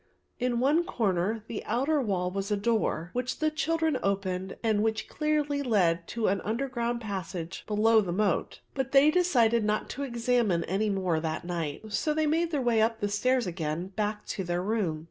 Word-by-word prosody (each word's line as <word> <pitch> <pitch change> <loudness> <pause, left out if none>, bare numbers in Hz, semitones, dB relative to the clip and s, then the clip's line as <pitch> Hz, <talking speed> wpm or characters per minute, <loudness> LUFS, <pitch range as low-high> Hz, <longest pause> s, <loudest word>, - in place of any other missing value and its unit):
In 245 -1 0
one 295 +7 +3
corner 195 - 0
on 225 -1 -6
the 225 -2 -5
outer 275 +7 +1
wall 185 -6 -1
was 195 +1 -3
a 210 - +1
door, 200 -6 0
which 250 0 -2
the 310 0 +1
children 320 -2 0
opened, 190 -1 -2
and 215 -2 +2
which 220 0 -1
clearly 300 -2 0
led 180 -9 +2
to 230 - -4
the 195 +1 +1
underground 235 0 -2
passage 185 -5 -5
below 220 +1 +4
the 185 -4 -3
moat; 195 -1 0
but 265 -1 -3
they 280 +2 +7
decided 240 -11 +3
not 210 0 0
to 280 - -6
examine 235 -8 +1
any 200 +5 0
more 185 -5 0
that 160 +1 -3
night. 175 +4 -4
So 300 +9 0
they 310 0 +2
made 325 +3 +1
their 290 -5 -1
way 235 -2 +3
up 225 0 +1
the 205 - -1
stairs 250 +4 +1
again 170 0 -3
back 210 +1 -3
to 190 - -2
their 175 0 -2
room. 195 -7 -1
220 Hz, 190 wpm, -28 LUFS, 190-255 Hz, -, they